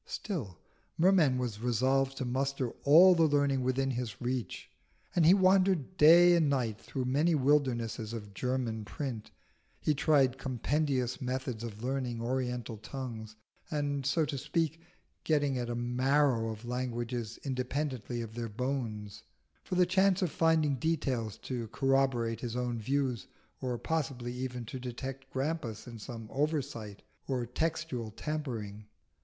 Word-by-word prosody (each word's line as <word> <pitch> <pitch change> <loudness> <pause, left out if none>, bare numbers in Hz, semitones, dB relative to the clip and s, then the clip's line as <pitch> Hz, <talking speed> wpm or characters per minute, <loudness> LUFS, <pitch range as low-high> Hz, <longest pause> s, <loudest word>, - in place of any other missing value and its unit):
Still, 130 - -4 0.4
Merman 165 -7 +4
was 120 -5 -3
resolved 130 +3 +1
to 130 - -2
muster 130 0 -1
all 170 +6 +8
the 165 -2 +4
learning 140 -2 +2
within 130 +1 0
his 120 -5 -4
reach, 125 -1 -3 0.5
and 165 -3 +5
he 180 - +8
wandered 185 -4 +3
day 175 +2 +8
and 160 -4 +3
night 120 -6 -1
through 130 -2 -4
many 150 +6 +2
wildernesses 130 -6 +1
of 105 -3 -7
German 120 -1 -2
print, 120 -1 -5 0.5
he 155 - +1
tried 135 -3 +3
compendious 135 0 -1
methods 125 -2 -3
of 110 -1 -7
learning 125 -2 -2
oriental 125 -1 -2
tongues, 110 -1 -7 0.3
and, 145 -2 -1
so 155 +4 +2
to 140 -2 -3
speak, 160 +2 -1 0.4
getting 145 -4 +1
at 120 - -2
the 120 - -3
marrow 125 0 +2
of 110 +1 -7
languages 120 -2 -3
independently 130 -2 -2
of 110 -1 -8
the 115 0 -4
bones, 110 -4 -3 0.4
for - - -4
the 180 0 +5
chance 190 +1 +3
of 175 - 0
finding 160 -4 +2
details 130 -7 -1
to 120 -3 -4
corroborate 135 -3 +1
his 120 -1 -4
own 125 -1 -1
views, 130 0 -1 0.3
or 125 -2 -2
possibly 135 -5 -2
even 125 -1 -4
to 130 - -6
detect 135 +2 -6
Grampus 135 -5 -3
in 120 -2 -9
some 115 0 -7
oversight 140 -8 -2 0.2
or 125 -3 -1
textual 130 -2 -2
tampering. 110 -6 -5
130 Hz, 140 wpm, -31 LUFS, 120-145 Hz, 0.5 s, all